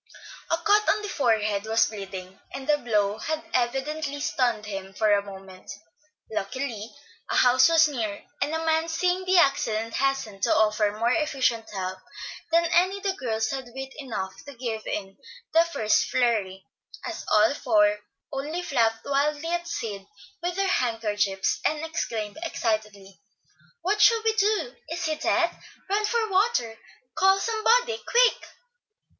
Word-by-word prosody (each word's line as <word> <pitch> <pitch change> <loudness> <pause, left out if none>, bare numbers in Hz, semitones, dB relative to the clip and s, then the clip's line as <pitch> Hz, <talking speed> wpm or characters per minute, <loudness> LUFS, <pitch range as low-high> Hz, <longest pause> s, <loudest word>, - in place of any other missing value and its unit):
A 330 - +2
cut 420 +4 +3
on 420 0 +2
the 415 - -4
forehead 215 - +1
was 225 0 +4
bleeding, 190 -3 -8 0.2
and 270 - -6
the 300 -1 +3
blow 210 -3 0
had 315 +6 -3
evidently 275 +4 -1
stunned 240 -6 0
him 195 -2 -7
for 215 0 +3
a 200 - +3
moment. 190 -2 -11 0.6
Luckily, 220 +1 -4 0.4
a - - -1
house 255 +4 +5
was 320 -1 +6
near, 225 -8 -4 0.2
and 290 - 0
a 325 0 -2
man 320 0 +2
seeing 360 +3 0
the 370 0 +3
accident 230 -7 +2
hastened 270 -8 -1
to - - +3
offer 215 -1 +2
more 230 +2 +1
efficient 260 -6 0
help 190 -2 -4 0.5
than 335 +1 +4
any 370 +3 +3
the 395 -1 -1
girls 225 -8 -2
had 265 -3 -5
wit 265 0 -6
enough 215 -9 -4
to 285 -1 -10
give 230 -3 -4
in 195 -2 -4 0.4
the 330 +1 +6
first 310 -1 +1
flurry, 210 -8 0 0.4
as 340 -1 -5
all 215 +5 +5
four 210 -6 +2 0.3
only 305 +6 -3
flapped 230 -7 +1
wildly 290 +3 0
at 345 0 -2
Sid 210 -12 -5 0.3
with 350 +1 -2
their 390 0 +1
handkerchiefs, 210 - 0
and 310 +1 0
exclaimed 225 -8 -4
excitedly, 215 - -3 0.6
"What 415 +3 +1
shall 455 -2 +5
we 445 0 +2
do? 435 +3 +1
Is 345 +1 -3
he 315 - 0
dead? 340 +2 +1 0.4
Run 420 +1 +2
for 455 0 0
water. 375 - +1 0.4
Call 385 0 +4
somebody, 460 +2 +2
quick." 485 0 +2
260 Hz, 150 wpm, -26 LUFS, 215-335 Hz, 0.6 s, was